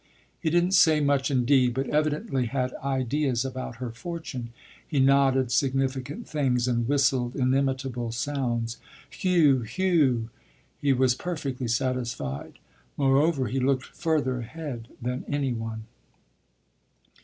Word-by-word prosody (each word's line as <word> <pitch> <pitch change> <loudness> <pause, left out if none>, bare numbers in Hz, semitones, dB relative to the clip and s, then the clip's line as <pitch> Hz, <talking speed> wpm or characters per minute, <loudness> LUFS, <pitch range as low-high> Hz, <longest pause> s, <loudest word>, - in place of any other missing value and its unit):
He 160 - 0
didn't 175 +3 +2
say 160 -5 +5
much 140 -1 +2
indeed, 125 -2 +3
but 135 0 -1
evidently 150 - 0
had 125 +1 -2
ideas 135 -1 0
about 130 -2 -5
her 125 0 -5
fortune; 130 -2 -6 0.4
he 145 - 0
nodded 135 -2 +4
significant 135 - -1
things 130 -5 0
and 120 -2 0
whistled 130 -3 +1
inimitable 130 -2 0
sounds 120 -2 -2 0.3
"Heuh, 160 -8 +3
heuh!" 135 - +1 0.5
He 145 - +3
was 130 -1 +3
perfectly 135 -5 -4
satisfied; 120 - -2 0.4
moreover, 140 +1 +3
he 135 +5 -1
looked 130 0 +1
further 145 -6 -1
ahead 125 -2 -6
than 125 +1 -3
any 140 -3 0
one. 115 -1 -5
130 Hz, 120 wpm, -26 LUFS, 125-145 Hz, 0.5 s, say